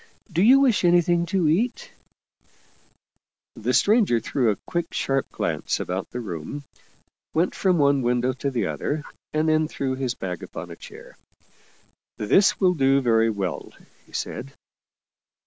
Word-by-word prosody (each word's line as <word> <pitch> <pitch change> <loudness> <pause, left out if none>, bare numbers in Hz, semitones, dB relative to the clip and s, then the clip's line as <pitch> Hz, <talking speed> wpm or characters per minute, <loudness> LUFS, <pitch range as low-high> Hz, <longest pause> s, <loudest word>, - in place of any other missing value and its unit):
Do 170 - +2
you 260 +7 +7
wish 250 -8 +3
anything 175 0 +3
to 185 -2 +1
eat? 240 - 0 0.8
" - - -41
The - - -2
stranger 205 - +3
threw 120 +2 0
a 105 - +1
quick, 170 -1 -3
sharp 135 0 0
glance - - -2
about 95 +1 -4
the 125 - -5
room, 100 - -6 0.7
went 170 +3 +2
from 185 -3 +1
one 140 -2 +3
window 125 +1 +1
to 135 +2 -3
the 120 -6 -1
other, 120 - -3 0.3
and 155 +1 0
then 155 0 +2
threw 135 -3 -3
his 130 -2 -2
bag 90 -2 -5
upon - - -8
a - - -8
chair. - - -13 0.5
" - - -37
This 190 - +3
will 185 -2 +4
do 135 -3 +3
very 115 -3 +3
well," 100 -5 -4 0.3
he - - -21
said. 70 - -5
140 Hz, 155 wpm, -24 LUFS, 120-175 Hz, 0.8 s, you